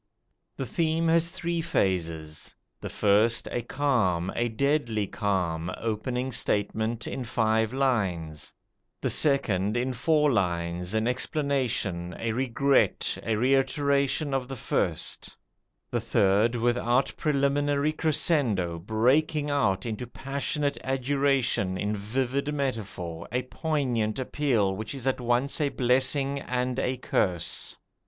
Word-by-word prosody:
The 135 - -3
theme 165 +5 0
has 165 0 +3
three 170 0 -2
phases: 85 - -2 0.2
the - - -6
first 105 +3 +3
a 120 - -1
calm, 110 -10 0
a 120 0 0
deadly 120 -3 0
calm, 90 -5 -1
opening 125 +4 -2
statement 110 0 -1
in 130 - -4
five 110 -1 +1
lines; 95 - -1 0.5
the - - 0
second 110 -8 +2
in 130 +2 -1
four 150 +3 +2
lines, 90 -1 -1
an 110 +1 +1
explanation, 125 - -1
a 115 - -2
regret, 135 +3 +1
a 110 0 -1
reiteration 140 +3 +1
of 130 -2 -1
the 135 - -5
first; 90 -8 -2 0.5
the 120 - 0
third, 110 0 +2
without 120 +2 +1
preliminary 145 0 +1
crescendo, 140 - +1
breaking 140 - +1
out 100 -9 +1
into 115 +1 -4
passionate 140 +3 -2
adjuration 135 -7 +1
in 105 +2 -1
vivid 130 +7 -1
metaphor, 105 - -4
a 125 +1 0
poignant 125 -6 -1
appeal 125 -7 0
which 110 +6 -5
is 135 -2 -7
at 130 -1 0
once 125 +5 0
a 145 - +2
blessing 135 +2 +1
and 125 0 -2
a 130 -1 -1
curse. 90 -8 -1
125 Hz, 120 wpm, -27 LUFS, 105-140 Hz, 0.5 s, has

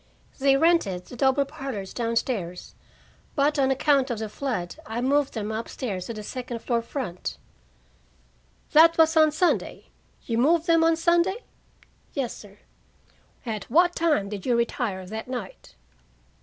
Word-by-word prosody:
"They 270 0 +4
rented 275 - +2
the - - -11
double 265 +2 +2
parlors 255 -9 -6
down 230 -1 -2
stairs, 185 -8 -3 0.6
but 290 +1 +2
on 265 -1 +3
account 270 0 +2
of 240 - -2
the 220 0 -4
flood 220 -7 -4
I 225 +2 -3
moved 275 +2 +1
them 215 -1 -3
up 220 +1 -4
stairs 195 -8 -4
to 230 - -4
the 215 - -7
second 245 0 -6
floor 235 -2 0
front." 230 -7 -5 1.3
"That 330 +2 +6
was 320 0 +4
on 310 -1 +6
Sunday? 345 +4 0 0.4
You 230 -1 -1
moved 320 +6 +3
them 330 -2 +4
on 330 0 +4
Sunday?" 345 +6 +1 0.7
"Yes, 265 -5 -2
sir." 205 -1 -14 0.9
"At 215 -4 -4
what 350 +7 +3
time 305 -12 +1
did 200 -2 -6
you 245 - +1
retire 230 -5 -1
that 220 +5 -6
night?" 245 -7 -7
255 Hz, 155 wpm, -25 LUFS, 220-305 Hz, 1.3 s, That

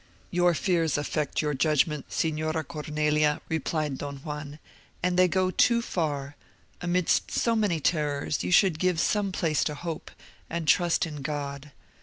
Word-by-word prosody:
"Your 175 -1 +3
fears 165 -4 +1
affect 150 +1 -1
your 150 -1 0
judgment, 150 +1 +1
Signora 155 0 -1
Cornelia," 150 -1 0
replied 155 -3 -1
Don 140 -1 -5
Juan; 150 0 -7 0.5
"and 180 0 +1
they 185 0 +5
go 185 +1 +1
too 235 +5 +4
far. 145 -10 -2 0.5
Amidst 180 0 +1
so 230 -1 +1
many 205 -7 +1
terrors, 150 -2 0
you - - -2
should 180 -3 +4
give 180 -2 +1
some 205 +1 +1
place 160 -5 +1
to 150 - -2
hope, 165 +1 -6 0.4
and 165 -1 -3
trust 175 +1 +3
in 150 -3 -7
God. 140 0 -5
155 Hz, 150 wpm, -27 LUFS, 150-175 Hz, 0.5 s, they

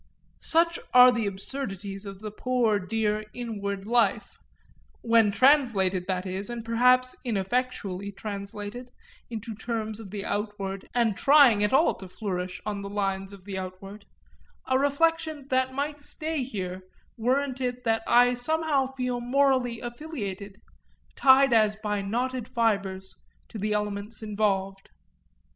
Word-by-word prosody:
Such 335 +1 +2 0.2
are 250 0 +9
the 235 -4 -1
absurdities 200 -1 -5
of 195 0 -9
the 215 -1 -6
poor 235 -2 +1
dear 215 +2 -1
inward 200 -5 -4
life 235 +2 +1 0.6
when 230 -2 +4
translated, 200 -7 +3
that 185 -1 -2
is, 190 +3 -3
and 235 -1 -6
perhaps 250 +2 +3
ineffectually 205 -3 -2
translated, 205 +4 -7 0.4
into 225 -1 -6
terms 220 0 -4
of 215 -3 -9
the 200 0 -5
outward 205 -2 -4
and 230 -4 +2
trying 275 -7 +6
at 210 - +2
all 290 +5 +4
to 190 - -10
flourish 180 -2 -4
on 205 -1 -3
the 200 - -6
lines 195 -1 -2
of 195 -2 -13
the 195 -2 -4
outward; 195 +2 -9 0.6
a 260 0 +2
reflection 310 +1 +1
that 260 0 +1
might 290 +2 -2
stay 315 +2 -4
me 260 - -1
here 185 -6 -5 0.3
weren't 260 +3 0
it 250 0 -2
that 225 -1 +1
I 245 +1 +5
somehow 290 +1 +1
feel 250 -2 -3
morally 255 -2 +1
affiliated, 220 - -6 0.6
tied 270 -1 +6
as 215 -2 +4
by 210 -1 -2
knotted 245 +4 -2
fibres, 200 -6 -1 0.3
to 220 - -7
the 210 +1 -1
elements 210 +1 -3
involved. 195 -2 -1
220 Hz, 140 wpm, -27 LUFS, 200-255 Hz, 0.6 s, are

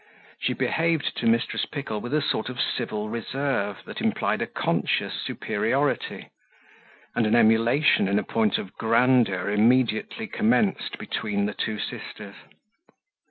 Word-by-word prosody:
She - - 0
behaved 165 -2 0
to 115 - 0
Mrs. 115 +2 +1
Pickle 135 -8 -4
with 120 - -6
a 155 - +1
sort 110 - -1
of 125 -2 -7
civil 110 -3 -2
reserve 115 -2 -2
that - - -7
implied - - 0
a - - -1
conscious - - -1
superiority; - - -1 0.8
and 115 - +1
an 110 - +3
emulation 115 +3 +4
in 100 +1 +1
point 110 -3 +1
of 95 - -7
grandeur 115 -5 +2
immediately 120 - +2
commenced 220 -2 +1
between 100 -2 -2
the 105 - -2
two 110 -1 -3
sisters. 100 0 -7
115 Hz, 130 wpm, -25 LUFS, 105-130 Hz, 0.8 s, emulation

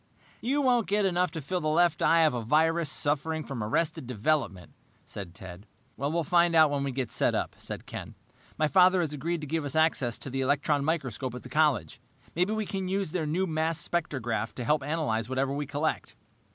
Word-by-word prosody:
"You 280 +5 0
won't 245 -4 +3
get 205 +1 +2
enough 180 -1 +2
to 160 +1 -6
fill 180 +6 -2
the 155 - -1
left 165 +1 +3
eye 165 0 +5
of 155 -3 +4
a 120 - -2
virus 160 +6 +2
suffering 155 +2 -1
from 130 -7 -5
arrested 140 +3 -1
development," 115 - -1 0.3
said 95 -4 -8
Ted. 95 +1 -10 0.3
"We'll 155 +5 -1
find 170 +2 +3
out 155 -2 +6
when 140 -1 -1
we 140 - -2
get 130 -2 -3
set - - +1
up," - - -2
said - - -7
Ken. - - -8 0.4
"My 155 - +2
father 185 +2 +5
has 155 -3 -2
agreed 165 +3 -2
to - - -5
give 160 +2 -1
us 145 0 -4
access 155 -7 +2
to 135 - -8
the 135 +1 -1
electron 145 +2 +1
microscope 135 -5 -2
at 125 - -8
the - - -10
college. 145 - +1 0.3
Maybe 180 +5 +1
we 220 0 -1
can 190 -1 -3
use 195 -3 -1
their 160 -3 -2
new 175 +5 0
mass 160 -1 -1
spectrograph 120 -10 -2
to 125 - -4
help 150 +5 +2
analyze 135 -7 -1
whatever 135 +1 0
we 145 0 -3
collect." 145 +3 -2
155 Hz, 205 wpm, -28 LUFS, 130-170 Hz, 0.4 s, out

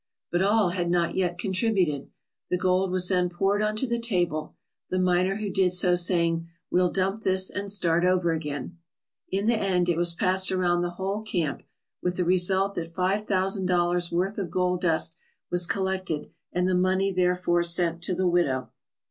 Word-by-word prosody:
But 175 - +1
all 205 0 +3
had 175 -1 -2
not 175 -1 +1
yet 180 -2 -1
contributed. 185 - 0 0.4
The 180 - +1
gold 185 +1 +1
was 180 0 +2
then 180 -1 +1
poured 195 +4 0
on 215 0 0
to 215 - +1
the 235 -1 -2
table, 175 -9 -1 0.3
the 185 - -1
miner 185 +1 +2
who 205 -1 -4
did 185 -1 +2
so 180 0 +3
saying: 170 -2 +2 0.2
'We'll 180 0 +3
dump 195 +4 -1
this 190 -2 +2
and 200 0 -4
start 175 -4 +2
over 180 -2 +2
again/ 150 0 -5 0.5
In 195 +2 -1
the 235 - +3
end 185 -4 0
it 170 - +1
was 170 0 0
passed 190 -1 +1
around 175 -2 +1
the 175 - -1
whole 190 +4 -4
camp, 175 -9 -2 0.4
with 180 0 -2
the 180 - 0
result 190 +2 +2
that 165 -2 -6
five 195 +3 0
thousand 190 -1 0
dollars' 175 -1 +1
worth 190 +5 -1
of 185 -4 -3
gold 180 0 0
dust 165 -1 0 0.3
was 175 -1 +3
collected 190 -7 -2 0.2
and 180 +1 0
the 185 - +1
money 185 +2 +1
therefor 180 -1 +1
sent 170 -1 +1
to 180 +2 0
the 185 0 0
widow. 140 -8 0
180 Hz, 185 wpm, -26 LUFS, 175-190 Hz, 0.5 s, all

